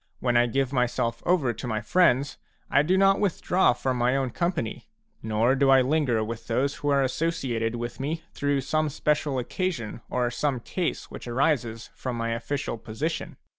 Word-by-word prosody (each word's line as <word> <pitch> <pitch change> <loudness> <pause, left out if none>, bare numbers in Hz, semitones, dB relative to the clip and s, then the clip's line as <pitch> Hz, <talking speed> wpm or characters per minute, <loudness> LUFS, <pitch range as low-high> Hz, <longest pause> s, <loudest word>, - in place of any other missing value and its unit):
When 120 -1 0
I 120 0 +5
give 135 +2 0
myself 120 -2 0
to 130 -10 0
my 110 -2 -1
fHends, 140 +2 +2 0.3
I 140 - +5
do 180 +6 +2
not 195 0 +4
withdraw 190 -3 +2
from 130 +1 -2
my 125 +2 +2
own 130 -2 -1
company, 170 -7 -2 0.3
nor 110 +3 +2
do 135 0 +3
I 135 -1 +7
linger 130 -5 +1
with 115 +1 -6
those 135 +4 0
who 145 - -2
are 140 -1 +3
associated 130 -6 -1
with 120 0 -5
me 155 +4 -3
through 145 -1 0
some 155 +3 0
special 150 -1 0
occasion 125 - -3
or 120 -1 0
some 135 +1 -1
case 175 +8 -3
which - - -8
arises 120 -3 0
from 125 -2 -4
my 115 0 -1
official 115 +1 -3
position. 140 +11 -4
130 Hz, 170 wpm, -26 LUFS, 120-150 Hz, 0.3 s, I